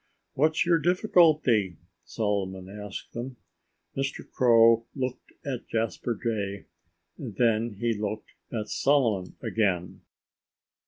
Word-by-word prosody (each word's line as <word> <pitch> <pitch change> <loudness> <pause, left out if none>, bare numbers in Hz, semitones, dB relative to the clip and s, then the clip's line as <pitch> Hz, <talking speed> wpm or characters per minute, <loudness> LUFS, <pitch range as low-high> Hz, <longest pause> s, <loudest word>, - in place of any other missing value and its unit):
"What's 155 +4 +2
your 170 -1 +4
difficulty?" 155 - +3 0.3
Solomon 95 -3 -2
asked 105 0 -8
them. 125 +2 -6 0.6
Mr. 135 0 -3
Crow 115 -2 +5
looked 130 -2 -4
at 130 -4 -4
Jasper 115 +1 -2
Jay. 100 -4 -2 0.5
And 120 -8 -7
then 115 -1 +1
he 120 0 +1
looked 105 0 -4 0.2
at 110 -3 -3
Solomon 115 -10 +1
again. 95 -5 -1
115 Hz, 105 wpm, -27 LUFS, 105-130 Hz, 0.6 s, Crow